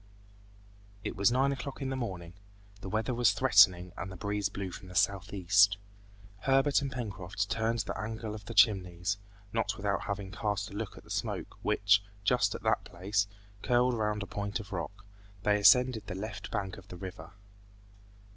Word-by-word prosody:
It - - -4
was 100 +4 +3
nine 135 +3 +3
o'clock 140 0 -5
in 135 -2 -3
the 135 - -2
morning. 90 -9 -5 0.5
The 95 - -7
weather 110 +5 -1
was 120 -4 +4
threatening 100 -7 +5
and 95 - -5
the - - -8
breeze 100 +1 -1
blew 100 -2 -5
from 95 - -9
the 90 - -11
southeast. 100 0 +3 0.6
Herbert 135 +5 +3
and 140 -1 -3
Pencroft 100 -4 -4
turned 115 +1 +1
the - - -4
angle 110 0 -4
of 105 -1 -9
the 115 - -7
Chimneys, 95 -2 +3 0.3
not 115 -1 0
without 100 -1 -1
having 100 -1 -4
cast 105 -1 -2
a - - -10
look 105 -1 -5
at - - -12
the - - -14
smoke - - -3
which, 100 0 +3 0.2
just 125 +4 +2
at - - -8
that - - +2
place, 100 +3 -1 0.3
curled 125 +1 +3
round 105 -2 -1
a - - -5
point 100 0 -3
of 100 -2 -9
rock: 100 +3 -5 0.4
they 105 0 +3
ascended 125 +2 +5
the 95 - -4
left 105 +2 -6
bank 100 -1 -3
of 95 - -17
the 90 - -9
river. 90 -2 -8
105 Hz, 180 wpm, -31 LUFS, 95-115 Hz, 0.6 s, threatening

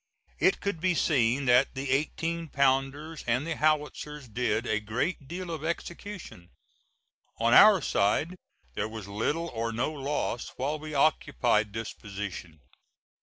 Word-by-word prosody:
It 390 - +3
could 200 -6 -2
be 180 0 +2
seen 135 -4 +2
that 125 +2 +4
the 135 0 -3
eighteen 165 +4 -1
pounders 140 +3 0
and 125 +5 +1
the 165 -1 -2
howitzers 150 -2 -1
did 120 +1 -1
a 110 -3 0
great 125 - -2
deal 175 +2 -5
of 160 -2 -5
execution. 170 - -6 0.9
On 115 +1 +3
our 205 -4 +8
side 145 - +1 0.4
there 105 +11 -2
was 110 -3 -7
little 145 +12 -1
or 115 -2 -3
no 120 +6 -1
loss 140 -4 -3
while 145 +4 -1
we 155 0 -7
occupied 120 -7 +2
this 110 -1 -4
position. 95 -6 -7
135 Hz, 140 wpm, -28 LUFS, 115-160 Hz, 0.9 s, our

